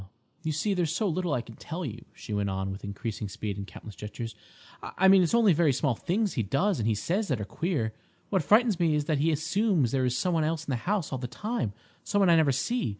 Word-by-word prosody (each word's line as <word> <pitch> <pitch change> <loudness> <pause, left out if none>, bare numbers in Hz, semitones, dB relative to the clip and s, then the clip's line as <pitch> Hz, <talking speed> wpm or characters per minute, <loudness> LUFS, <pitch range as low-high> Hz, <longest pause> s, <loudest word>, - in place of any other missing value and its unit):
"You 160 -1 -2
see, 175 +7 0
there's 175 -5 0
so 200 +5 0
little 180 -1 -1
I 120 - 0
can 115 - -12
tell 170 +2 -5
you," 115 -2 -7
she 105 - -7
went 100 -1 0
on, 95 0 -2
with 95 - -8
increasing 105 +1 -4
speed 105 -1 -4
and 100 -1 -6
countless 105 +3 -10
gestures. 110 +3 -6 0.5
"I 190 - +1
mean 190 0 +7
it's 180 +5 +2
only 225 -6 +5
very 160 -2 +3
small 135 0 +1
things 200 - -1
he - - 0
does 150 - +1
and 110 -1 +1
says 195 - -1
that 130 -7 0
are 105 - -3
queer. 140 - -2 0.4
What 190 -3 +3
frightens 215 - +4
me 165 -3 +3
is 150 -1 0
that 150 -2 0
he 160 +3 +3
assumes 160 - +1
there 135 -1 +1
is 125 0 +1
some 180 - 0
one 160 -2 +2
else 160 +1 -1
in - - -2
the - - +1
house 200 -6 0
all 130 - -2
the 125 - -4
time—some 205 - -3
one 190 -3 +5
I - - +7
never 155 -4 +4
see. 235 - 0
155 Hz, 250 wpm, -28 LUFS, 115-185 Hz, 0.5 s, mean